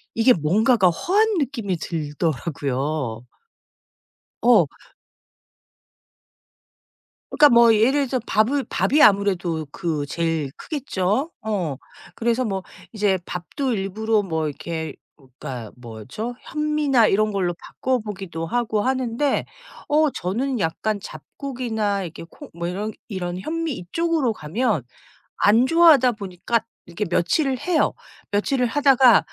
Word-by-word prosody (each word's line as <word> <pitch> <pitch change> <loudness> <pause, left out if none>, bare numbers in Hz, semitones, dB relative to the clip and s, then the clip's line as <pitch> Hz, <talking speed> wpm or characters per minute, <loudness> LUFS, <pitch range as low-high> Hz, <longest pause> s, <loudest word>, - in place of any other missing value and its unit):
이게 230 +3 +5
뭔가가 195 - +3
허한 405 - +1
느낌이 235 - -2
들더라고요. 145 -5 -2 1.2
어. - - +5 2.6
그러니까 295 - +6
뭐 235 -2 +6
예를 265 +6 +3
들어서 255 0 -1
밥을 255 +7 +2
밥이 215 - +2
아무래도 190 -6 +3
그 160 -5 -2
제일 165 -1 -1
크겠죠. 270 - -2
어. 195 -9 -2 0.4
그래서 235 +2 0
뭐 195 -3 -3 0.3
이제 205 -3 +2
밥도 250 - -3
일부러 215 +2 0
뭐 160 -4 -2
이렇게 160 +2 -5 0.2
어 140 - -21
그니까 120 -5 -6
뭐죠? 125 - -7
현미나 300 -6 +2
이런 215 +2 +2
걸로 185 -3 0
바꿔보기도 205 -9 -3
하고 220 +2 0
하는데 260 +2 0 0.4
어 305 +1 +4
저는 245 +8 -2
약간 205 +5 -1
잡곡이나 220 - -3
이렇게 170 -2 -8
콩 - - -13
뭐 170 +1 -4
이런 200 +5 -3 0.2
이런 180 -4 -4
현미 325 - -3
이쪽으로 300 - -1
가면 205 - -1 0.5
안 225 +5 +4
좋아하다 305 -5 +6
보니까 205 +2 -2 0.3
이렇게 175 +5 -4
며칠을 255 - +1
해요. 350 -3 +1 0.4
며칠을 250 +5 +1
하다가 260 -2 +5
210 Hz, 260 characters per minute, -22 LUFS, 170-255 Hz, 2.6 s, 그러니까